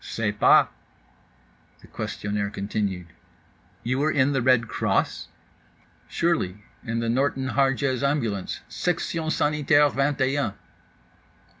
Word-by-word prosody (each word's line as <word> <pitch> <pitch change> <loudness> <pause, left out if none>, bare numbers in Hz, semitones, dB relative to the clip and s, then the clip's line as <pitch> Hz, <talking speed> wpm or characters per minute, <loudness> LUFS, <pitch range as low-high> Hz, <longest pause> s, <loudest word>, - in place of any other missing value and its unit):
—"Sais 110 -2 -2
pas." 105 - +5 1.1
The - - -15
questionnaire 100 0 -3
continued: 100 -3 -3 0.8
"You 130 +3 -1
were 150 +2 +2
in 145 -2 +2
the 135 - +1
Red 125 -2 +3
Cross?"—"Surely, 105 - -3 0.2
in 115 0 -2
the 115 - -2
Norton 130 +2 0
Harjes 135 -1 +1
Ambulance, 120 -9 -1
Section 165 -2 -2
Sanitaire 150 -1 +3
Vingt 140 +1 0
et 130 +1 +2
Un." 140 -8 -1
130 Hz, 110 wpm, -25 LUFS, 105-145 Hz, 1.1 s, pas